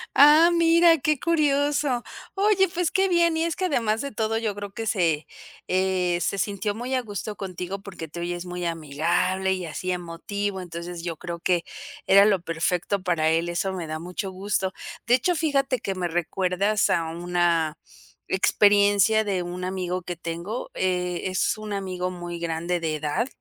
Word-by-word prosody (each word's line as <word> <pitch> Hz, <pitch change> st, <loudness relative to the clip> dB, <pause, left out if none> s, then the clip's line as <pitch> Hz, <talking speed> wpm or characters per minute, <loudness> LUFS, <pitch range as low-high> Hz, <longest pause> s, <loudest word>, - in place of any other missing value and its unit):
Ah, 300 Hz, +4 st, +8 dB
mira 335 Hz, 0 st, +5 dB
qué 300 Hz, +1 st, +1 dB
curioso, 290 Hz, -5 st, +1 dB, 0.3 s
oye, 390 Hz, -1 st, +3 dB
pues, 350 Hz, -1 st, -1 dB
qué 385 Hz, 0 st, +2 dB
bien, 340 Hz, -2 st, +3 dB
y 325 Hz, +1 st, +1 dB
es 335 Hz, -, -1 dB
que 375 Hz, -, -1 dB
además 225 Hz, -9 st, +1 dB
de 280 Hz, -, -4 dB
todo, 220 Hz, 0 st, -1 dB
yo 220 Hz, -3 st, -1 dB
creo 205 Hz, 0 st, -7 dB
que 225 Hz, +3 st, -5 dB
se 170 Hz, -8 st, +1 dB, 0.4 s
eh, 185 Hz, -1 st, +1 dB
se 200 Hz, -, -1 dB
sintió 205 Hz, +1 st, -1 dB
muy 245 Hz, +4 st, -4 dB
a 255 Hz, -, +2 dB
gusto 210 Hz, -2 st, -5 dB
contigo, 185 Hz, 0 st, -5 dB
porque 190 Hz, -5 st, -8 dB
te 165 Hz, +3 st, -8 dB
oyes 175 Hz, +1 st, -4 dB
muy 180 Hz, 0 st, -5 dB
amigable 170 Hz, +4 st, 0 dB
y 185 Hz, -2 st, -4 dB
así 165 Hz, +3 st, -5 dB
emotivo, 185 Hz, +3 st, -3 dB
entonces, 170 Hz, 0 st, -7 dB
yo 170 Hz, -2 st, -4 dB
creo 170 Hz, -1 st, -6 dB
que 175 Hz, 0 st, +1 dB, 0.4 s
era 200 Hz, +1 st, +7 dB
lo 200 Hz, -4 st, +3 dB
perfecto 175 Hz, +3 st, -1 dB
para 160 Hz, -3 st, +1 dB
él, 165 Hz, +1 st, +1 dB
eso 190 Hz, +3 st, -1 dB
me 175 Hz, -4 st, -5 dB
da 155 Hz, -, -3 dB
mucho 180 Hz, +4 st, -5 dB
gusto, 190 Hz, 0 st, -1 dB, 0.4 s
de 245 Hz, -, +6 dB
hecho, 355 Hz, +8 st, +1 dB
fíjate 275 Hz, -5 st, +1 dB
que, 195 Hz, -, -3 dB
me 180 Hz, -1 st, -1 dB
recuerdas 185 Hz, +4 st, 0 dB
a 165 Hz, -, +1 dB
una 170 Hz, -2 st, 0 dB, 0.5 s
experiencia 205 Hz, +2 st, +4 dB
de 195 Hz, -3 st, -1 dB
un 175 Hz, +1 st, -5 dB
amigo 185 Hz, -1 st, -3 dB
que 175 Hz, 0 st, -5 dB
tengo, 170 Hz, +7 st, -5 dB
eh, 180 Hz, -1 st, -1 dB
es 185 Hz, +2 st, 0 dB
un 215 Hz, -1 st, -6 dB
amigo 185 Hz, -2 st, -3 dB
muy 175 Hz, -1 st, -6 dB
grande 170 Hz, +1 st, -2 dB
de 160 Hz, -2 st, -2 dB
edad, 150 Hz, -, -1 dB
190 Hz, 175 wpm, -25 LUFS, 175-225 Hz, 0.5 s, Ah